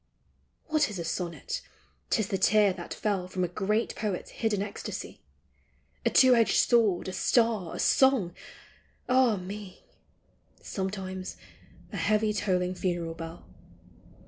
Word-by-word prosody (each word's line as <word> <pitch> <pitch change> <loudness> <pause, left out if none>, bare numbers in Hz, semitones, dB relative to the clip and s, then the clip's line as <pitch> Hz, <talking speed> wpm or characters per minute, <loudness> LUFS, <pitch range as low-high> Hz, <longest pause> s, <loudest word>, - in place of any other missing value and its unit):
What 310 -4 +2
is 205 - -6
a 170 - -3
sonnet? 180 - -3 0.5
'T - - +2
is 205 - -2
the 195 -3 -1
tear 205 0 +4
that 175 -2 -9
fell 195 -4 -1
From 185 0 -2
a - - +1
great 210 +5 -1
poet's 205 -4 -3
hidden 210 -3 0
ecstasy; 205 - -7 0.8
A - - +3
two 260 -1 +6
edged 230 -2 +3
sword, 220 -8 +3
a 185 - -4
star, 225 -8 +1
a - - -6
song, 265 -10 +3 0.4
— - - -29
ah 250 -4 +5
me! 190 +1 -8 0.8
Sometimes 190 -1 -5 0.6
a - - -3
heavy 215 0 +2
tolling 185 -3 0
funeral 175 -3 -2
bell. 165 +1 -9
195 Hz, 140 wpm, -28 LUFS, 180-220 Hz, 0.8 s, two